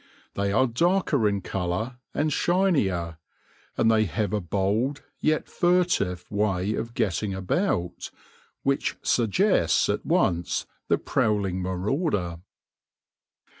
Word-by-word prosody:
They 100 0 -1
are 130 +6 +4
darker 145 - +2
in 100 -1 -2
colour 95 +7 -3
and 150 0 0
shinier; 100 - +1 0.6
and 115 - +4
they 110 -1 +3
have 105 +4 -2
a 105 - 0
bold, 105 - -1 0.2
yet 155 0 +1
furtive, 175 - +1
way 100 -1 0
of 115 +2 -4
getting 105 -2 -1
about, 95 - -1 0.5
which 140 0 0
suggests 115 - +2
at - - -1
once 85 0 +1 0.2
the - - +3
prowling 100 -4 0
marauder. 95 - -1
105 Hz, 110 wpm, -26 LUFS, 95-140 Hz, 0.6 s, are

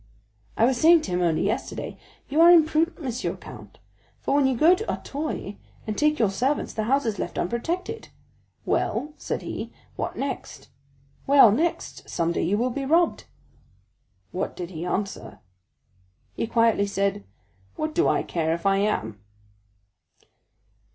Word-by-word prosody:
"I 225 - +5
was 255 0 +2
saying 335 +1 +7
to 195 - -6
him 180 0 0
only 165 -3 +1
yesterday, - - -3 0.3
'You 300 +4 +2
are 340 - +9
imprudent, 325 0 +4
Monsieur 255 -2 -3
Count; - - -12 0.4
for - - -2
when 280 -1 +4
you 260 -2 0
go 325 +8 +6
to 430 +5 -2
Auteuil 280 -8 -5 0.3
and 215 - -3
take 300 +3 +2
your 215 -5 +2
servants 260 +9 -1
the 215 - -2
house 275 +4 +2
is 220 -3 -2
left - - -4
unprotected.' 345 - -3 0.6
'Well,' 300 +1 -1
said - - -4
he, - - -5 0.3
'what - - -4
next?' 265 - -5 0.6
'Well, 275 -6 +7
next, 320 +10 -2
some 170 -1 0
day - - -1
you 195 +5 +1
will 250 +3 0
be 275 +3 -3
robbed.'" 330 +5 +2 1.1
"What - - -3
did 175 0 -6
he 170 0 -5
answer?" 195 +2 -4 1.0
"He - - -3
quietly 230 -3 +2
said, 200 0 -1 0.5
'What 310 0 -3
do 350 +3 +2
I - - +2
care 160 -1 -1
if 170 - -10
I 195 0 +3
am? 110 - -1
235 Hz, 155 wpm, -25 LUFS, 195-305 Hz, 1.1 s, are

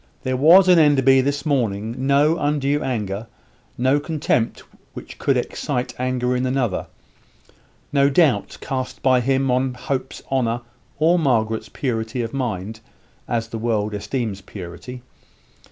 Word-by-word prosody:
There 130 -1 -1
was 170 +8 +7
in 180 -2 +6
Enderby 135 -3 +5
this 140 +1 -2
morning 115 -7 0
no 145 +3 +4
undue 145 0 0
anger, 105 -3 -3 0.5
no 130 +4 +2
contempt 145 -6 -1 0.3
which - - -10
could - - +2
excite 125 0 -3
anger 125 0 0
in 125 - -1
another; 125 -7 -1 1.1
no 140 -1 +4
doubt 140 - +2
cast 130 -1 -4
by 130 -1 +4
him 135 +1 +1
upon 130 0 0
Hope's 130 +1 -4
honour, 120 -3 0 0.4
or 165 +4 +3
Margaret's 110 -7 0
purity 120 -2 -2
of 115 - -6
mind, 110 -5 -3 0.5
as 115 -1 -2
the 115 - -5
world 110 -2 -1
esteems 105 -1 -3
purity. 95 +6 -9
130 Hz, 135 wpm, -21 LUFS, 115-140 Hz, 1.1 s, was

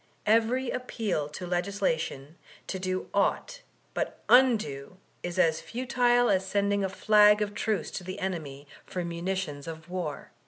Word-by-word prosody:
"Every 230 +4 +2
appeal 215 -11 -2
to 180 +4 -7
legislation 175 -5 -2 0.3
to 190 - -4
do 185 0 -2
au^t - - 0 0.3
but - - -3
u$^o 215 - +4 0.3
is 175 +1 -5
as 160 -3 +3
futile 245 0 +2
as 190 -1 +2
sending 200 +1 0
a 190 - 0
flag 210 +1 +5
of 205 0 -5
truce 210 -5 -1
to - - -5
the 185 +1 -6
enemy 155 -7 -4 0.2
for 180 -1 -3
munitions 170 -4 -3
of 160 +1 -8
war." 175 -6 -4
190 Hz, 145 wpm, -28 LUFS, 165-215 Hz, 0.3 s, flag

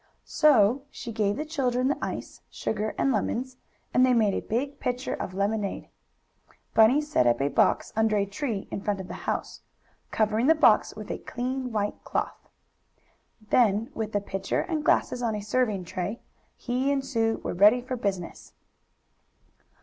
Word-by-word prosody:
So 260 -4 +4
she 235 - -7
gave 210 -2 0
the 305 - -3
children 255 -5 0
the 285 - +1
ice, - - -5
sugar 215 0 -3
and 275 - +2
lemons, 250 +3 -2 0.4
and 250 - +5
they 255 -1 +4
made 215 -4 +3
a - - -1
big 275 +6 -3
pitcher 250 +1 -2
of 185 - -5
lemonade. 200 0 -2 0.8
Bunny 225 +7 +5
set 295 - +1
up 120 - +3
a 140 +1 +1
box - - +2
under 220 -1 +2
a 200 - +2
tree 200 +1 -4
in - - -4
front 205 -1 -1
of 190 - -7
the - - -7 0.2
house, - - -3 0.5
covering 220 +3 +1
the 320 - +6
box 240 -9 +4
with 215 -1 -7
a - - -4
clean 255 +1 -4
white 210 -2 -2
cloth. - - -4 1.0
Then 225 +1 +3
with 220 -1 -4
the 205 - 0
pitcher 195 -1 -2
and 315 -4 -3
glasses 250 - +2
on 230 -3 0
a 210 - -4
serving 210 -3 0
tray, 185 +6 -4 0.4
he 255 +3 -1
and 275 -1 -1
Sue 225 -4 0
were - - -3
ready 205 +7 +6
for 255 +1 -4
business. 195 -7 -4
225 Hz, 170 wpm, -27 LUFS, 205-255 Hz, 1.0 s, the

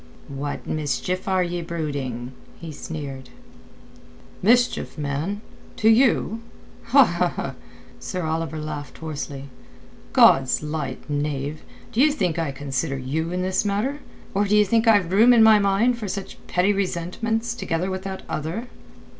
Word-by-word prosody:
"What 140 +1 -5
mischief 155 +5 -2
are 190 -1 +2
ye 175 0 -3
brooding?" 140 -7 -4 0.3
he 165 -1 -7
sneered. 140 -4 -7 1.1
"Mischief, 240 +1 +2
man? 150 +8 -2 0.3
To 220 - +3
you?" 225 -2 +3 1.6
Sir 185 -1 -4
Oliver 160 -1 -2
laughed 150 -1 -6
hoarsely. 145 -3 -5 0.7
"God's 135 +2 +5
light, 150 -2 -4
knave, 145 0 -2 0.3
d'ye 255 +6 +4
think 180 - -1
I 160 -4 -1
consider 135 +1 -3
you 155 +6 -2
in 180 0 -1
this 185 +1 +1
matter, 215 +8 -1 0.3
or 200 +1 +2
d'ye 210 +1 +4
think 225 +3 +1
I've 205 -6 +4
room 225 +6 +6
in 230 -2 +7
my 220 -1 +7
mind 205 +5 +2
for 215 - -4
such 195 +1 -6
petty 185 +3 +2
resentments 200 +5 -2
together 180 -5 -2
with 185 0 -3
that 190 0 -6
other?" 175 +11 -4
175 Hz, 130 wpm, -23 LUFS, 150-205 Hz, 1.6 s, in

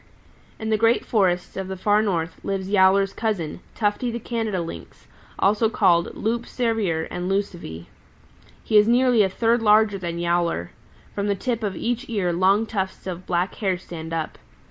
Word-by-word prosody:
"In 220 0 -4
the 215 - +2
great 230 +1 +3
forests 185 -5 +1
of 190 -1 -4
the 190 0 -5
Far 205 +3 +3
North 175 -5 -2
lives 195 -1 -3
Yowler's 195 0 +4
cousin, 200 -10 -2 0.2
Tufty 210 +3 0
the 235 - -3
Canada 225 -4 -2
Lynx, 165 -1 -8 0.3
also 215 +3 +3
called 175 -6 +2
Loup 235 +2 -2
Cervier 220 -10 -1
and 180 +1 -3
Lucivee. 175 - -3 0.8
He 215 - +3
is 210 - +3
nearly 245 -1 +4
a 195 - +3
third 230 +4 +1
larger 210 -2 +4
than 170 -2 -4
Yowler. 170 - 0 0.4
From 200 0 -2
the 200 - +1
tip 235 +3 -2
of 205 -3 -2
each 245 +7 -3
ear 195 -6 0
long 195 +5 +3
tufts 190 -4 -4
of 185 -1 -6
black 175 +2 0
hair 190 -4 -1
stand 165 -2 -8
up. 160 -1 -4
195 Hz, 170 wpm, -23 LUFS, 175-220 Hz, 0.8 s, Yowler's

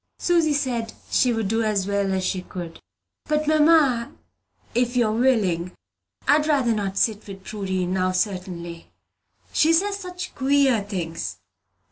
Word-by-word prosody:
Susy 335 -3 +2
said 245 -6 -1 0.2
she 250 - +3
would 225 -3 -1
do 225 +3 0
as 210 -3 0
well 200 -1 0
as 190 -1 -1
she 185 - -1
could. 175 -2 -8 0.5
"But, 305 0 0
mamma, 300 -6 +4 0.6
if 245 +1 0
you 240 - +4
are 215 - 0
willing, 205 -8 +1 0.5
I'd 300 +2 +4
rather 270 -6 +2
not 200 -2 -3
sit 215 -1 0
with 195 -1 -9
Prudy, 190 -3 -3
now, 185 +1 0
certainly. 180 -3 -3 0.6
She 315 - +4
says 395 +5 +2
such 360 -2 -7
queer 270 -4 +3
things. 165 - -4
220 Hz, 145 wpm, -23 LUFS, 190-280 Hz, 0.6 s, mamma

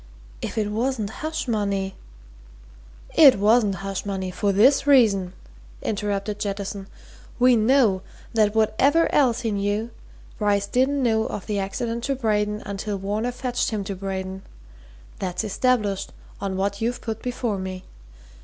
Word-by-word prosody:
If - - -5
it 210 -1 0
wasn't 225 -1 -1
hush 315 +3 -4
money 200 -4 -1 0.6
" - - -22
"It 270 - +9
wasn't 210 0 +3
hush 195 -1 -3
money, 190 -2 -3
for 200 +2 0
this 255 +9 +4
reason," 205 -10 +4 0.5
interrupted 205 0 -2
Jettison. 200 -1 -4 0.5
"We 250 0 +5
know 220 -4 +3 0.3
that 215 -2 +2
whatever 260 +9 +3
else 250 -4 +3
he 225 -2 -1
knew, 205 +3 -1 0.5
Bryce 205 -1 +2
didn't 265 +5 +1
know 220 -2 +2
of 200 - -6
the 205 -1 -1
accident 230 +4 -3
to 275 - 0
Braden 210 -3 0
until 200 +1 -3
Varner 210 +5 -2
fetched 245 0 -2
him 215 -3 -2
to 195 0 -5
Braden. 190 0 -5 0.8
That's 185 +1 -2
established 210 -2 0 0.3
on 195 -1 -3
what 200 +2 -1
you've 240 +2 -1
put 225 -1 -5
before 240 -5 -2
me. 185 -1 -5
210 Hz, 145 wpm, -24 LUFS, 195-235 Hz, 0.8 s, It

